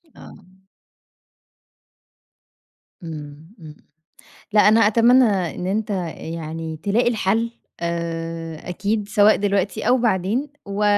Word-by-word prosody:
آه. - - -13 2.7
امم 155 +1 -9
امم، 155 -2 -11 0.8
لأ 210 - +5
أنا 220 +2 +5
أتمنى 240 +4 +5
إن 185 -4 -1
أنت 210 +3 -1
آآ 185 -4 -2
يعني 160 0 -5
تلاقي 205 +9 +1
الحل، 225 +1 0 0.3
آآ 165 -1 -4
أكيد 205 +3 -2
سواء 210 0 +5
دلوقتي 200 0 -1
أو 250 +1 +4
بعدين، 225 +5 0 0.2
و 200 +1 -2
195 Hz, 105 wpm, -21 LUFS, 165-215 Hz, 2.7 s, لأ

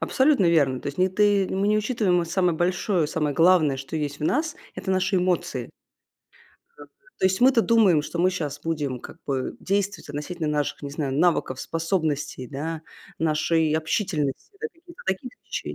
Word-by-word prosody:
Абсолютно 265 - +3
верно. 140 -6 +2
То - - -9
есть 145 - -7
не 185 +1 +4
ты 200 0 +3
мы 195 +2 0
не 215 0 +3
учитываем, 210 -6 +1
а - - -1
самое 175 0 +1
большое, 175 -1 +1
самое 150 -2 -1
главное, 165 -5 +5
что 135 +3 -8
есть 145 -2 -3
в 150 - -3
нас,- 310 - 0 0.2
это 190 - -4
наши 185 +1 +1
эмоции. 180 -1 -1 1.1
Ага. - - -12 0.3
То - - -1
есть 190 0 0
мы-то 250 -2 +5
думаем, 210 -10 +4
что 170 - -6
мы 180 +2 +4
щас 150 -6 -4
будем 145 -6 -2
как - - -10
бы 135 -2 -2
действовать 200 -1 -1
относительно 150 +3 -4
наших, 145 0 -1
не 140 - -5
знаю, 140 -2 -3
навыков, 145 -4 +1
способностей, 160 -6 -2
да, 155 +3 -4 0.4
нашей 160 0 +1
общительности, 160 - -1
да, 455 - -1
какие-то 345 +1 -15
такие-то. 190 +6 -4
170 Hz, 170 wpm, -25 LUFS, 150-190 Hz, 1.1 s, главное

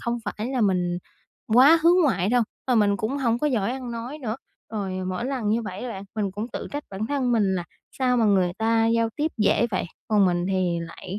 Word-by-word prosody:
không 235 0 -2
phải 215 +2 -4
là 260 -1 -1
mình 180 -4 +1 0.6
quá 280 +7 +8
hướng 350 +2 +5
ngoại 195 -9 +1
đâu, 245 0 +3 0.2
ờ, 255 - +1
mình 205 -2 +3
cũng 235 +8 -2
hổng 235 -3 +1
có 300 - 0
giỏi 235 -5 0
ăn 255 -2 -6
nói 240 +6 -6
nữa, 230 -4 -3 0.4
rồi 200 -3 -3 0.2
mỗi 185 +6 -3
lần 255 -6 -2
như 225 +2 +1
vậy 195 -2 -6
á 250 - -4
bạn, 195 -4 -6
mình 205 -3 -1
cũng 210 +5 -4
tự - - -5
trách 290 +1 -4
bản 200 +3 -3
thân 265 -3 0
mình 205 -5 +2
là 175 -2 -2 0.3
sao 250 -1 +2
mà 230 - +3
người 190 -4 +3
ta 225 0 +2
giao 230 0 +2
tiếp 310 +1 -1
dễ 215 +2 +3
vậy, 185 - -1 0.2
còn 205 -3 +4
mình 175 0 0
thì 185 -3 0
lại 180 +4 -7
225 Hz, 235 wpm, -24 LUFS, 195-250 Hz, 0.6 s, quá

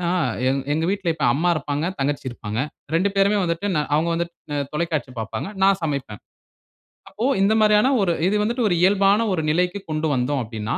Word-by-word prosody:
ஏன்னா, 175 0 0 0.4
எங் 135 0 0
எங்க 160 +2 0
வீட்ல 195 -4 -1
இப்ப 150 -4 -2
அம்மா 175 +5 +1
இருப்பாங்க, 145 0 -2
தங்கச்சி 140 0 -1
இருப்பாங்க, 110 -1 -4 0.3
2 185 +4 +2
பேருமே 200 +1 +3
வந்துட்டு 170 +3 -2
நா 150 - +2
அவங்க 165 +2 +1
வந்துட்டு 170 0 -3 0.2
அ 145 - -1
தொலைக்காட்சி 150 -4 -2
பாப்பாங்க, 110 - -4 0.2
நான் 195 -1 +4
சமைப்பேன். 140 -9 -4 0.9
அப்போ 225 - -4 0.2
இந்த 200 +2 +4
மாரியான 210 +4 +4
ஒரு 180 -3 +2
இது 205 - +1
வந்துட்டு 235 +2 0
ஒரு 175 - +2
இயல்பான 200 +2 +4
ஒரு 165 - 0
நிலைக்கு 180 +4 0
கொண்டு 155 +1 -1
வந்தோம் 130 +2 0
அப்படின்னா, 110 -1 -4
170 Hz, 185 wpm, -22 LUFS, 140-195 Hz, 0.9 s, நான்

